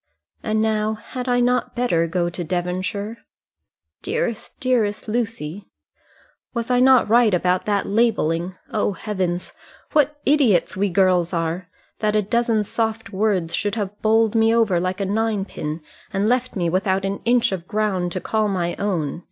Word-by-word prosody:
And, 215 0 0
now, 215 0 0
had 250 +3 -6
I 245 0 +3
not 250 0 +1
better 175 -9 +1
go 175 +1 0
to 175 +1 -4
Devonshire?" 185 +5 -3 0.8
"Dearest, 230 -3 -3
dearest 230 -6 0
Lucy." 210 -6 -3 0.9
"Was 235 +1 -2
I 250 - +4
not 260 -1 +5
right 225 -2 +4
about 180 +1 +1
that 205 -1 +1
labelling? 190 -5 +1 0.2
O 205 -1 +1
heavens! 185 -4 -3 0.4
what 295 0 +2
idiots 260 - +3
we 200 +1 +1
girls 180 -1 +2
are! 170 +2 -2 0.3
That 215 -1 +1
a 210 - +3
dozen 230 +1 +1
soft 225 +1 -2
words 190 -5 0
should 205 -1 -1
have 205 -2 -4
bowled 220 0 +3
me 225 0 +3
over 215 -7 +3
like 185 +2 -2
a - - 0
ninepin, 200 -7 -2 0.3
and 200 +2 0
left 250 +1 0
me 175 -3 0
without 190 +2 0
an 195 +1 -2
inch 240 -1 +3
of 180 -2 -4
ground 195 -4 -1
to 185 - -2
call 215 +3 0
my 175 -3 -1
own. 170 -7 -2
205 Hz, 160 wpm, -22 LUFS, 180-225 Hz, 0.9 s, not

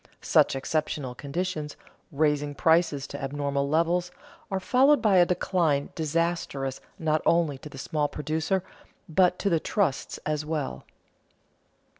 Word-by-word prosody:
Such - - +4
exceptional 140 -1 -2
conditions, 150 +2 -4 0.3
raising 145 -1 0
prices 160 -4 +2
to - - -7
abnormal 140 0 -1
levels, 170 +3 +1 0.4
are 190 - -1
followed 265 +7 +4
by 210 -4 +3
a 175 -1 +6
decline 170 -5 +1
disastrous 160 -4 -2 0.2
not 155 -1 +1
only 165 -5 +2
to 150 - -10
the 135 - -11
small 150 +2 -1
producer, 160 +6 -1 0.4
but 180 +2 +3
to - - -2
the 170 -4 +3
trusts 175 -6 -1
as 150 0 -1
well. 150 -3 -4
155 Hz, 130 wpm, -27 LUFS, 145-175 Hz, 0.4 s, a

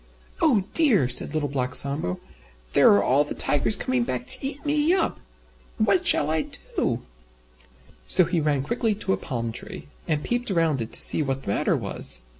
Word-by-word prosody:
"Oh 260 - +3
dear!" 245 - +3
said 125 +4 +2
Little 150 -2 -1
Black 130 -2 -3
Sambo, 140 - +1 0.5
"There - - +5
are 100 0 +2
all 135 +6 +2
the 145 - -6
Tigers 145 +9 +2
coming 255 -1 -2
back 245 - -3
to 260 +1 +6
eat 275 +2 -5
me 295 +2 +1
up! 380 - -1 0.6
What 200 -4 +1
shall 150 +1 +5
I 160 0 +1 0.3
do?" - - -1 1.0
So 180 - +4
he 170 0 -1
ran 145 -3 -1
quickly 225 - -1
to 190 -2 -2
a - - -1
palm 115 -4 -5
tree, 75 - -8 0.2
And 150 -2 -1
peeped 245 0 -2
round 165 -8 0
it 115 - -6
to - - +1
see - - +3
what 135 -2 -3
the - - -7
matter 100 - 0
was. - - 0
155 Hz, 190 wpm, -23 LUFS, -, 1.0 s, to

